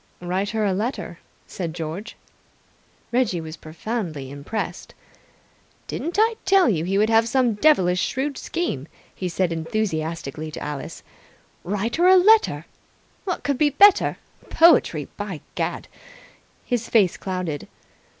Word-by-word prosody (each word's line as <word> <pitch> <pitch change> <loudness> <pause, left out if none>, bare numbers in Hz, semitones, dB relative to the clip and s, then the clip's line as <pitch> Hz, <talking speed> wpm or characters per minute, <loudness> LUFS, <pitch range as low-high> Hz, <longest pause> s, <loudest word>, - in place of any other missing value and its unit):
"Write 185 +3 -2
her 220 -1 -1
a 195 - +1
letter," 220 +7 -3 0.3
said 170 -4 -5
George. 170 +6 -6 1.0
Reggie 240 -8 +1
was 160 0 -7
profoundly 160 - -5
impressed. 145 +10 -5 0.9
"Didn't 340 +4 -4
I 445 +1 +3
tell 385 -3 +4
you 170 -9 +1
he 190 +3 0
would 215 +2 +2
have 225 +1 +4
some 250 -2 +2
devilish 190 -8 +3
shrewd 275 +3 -2
scheme?" 150 - -3 0.3
he 185 - -4
said 175 -1 0
enthusiastically 160 -4 -3
to 155 - -7
Alice. 150 -2 -6 0.6
"Write 205 - -2
her 350 +2 +4
a 375 0 +8
letter! 440 +4 +4 0.6
What 365 -3 -3
could 280 -3 -1
be 300 - +4
better? 395 +8 +5 0.3
Poetry, 300 - +4
by 200 -6 -5
Gad!" - - -3 0.8
His 240 -3 -2
face 200 -6 +3
clouded. 180 -6 -4
205 Hz, 130 wpm, -23 LUFS, 165-260 Hz, 1.0 s, a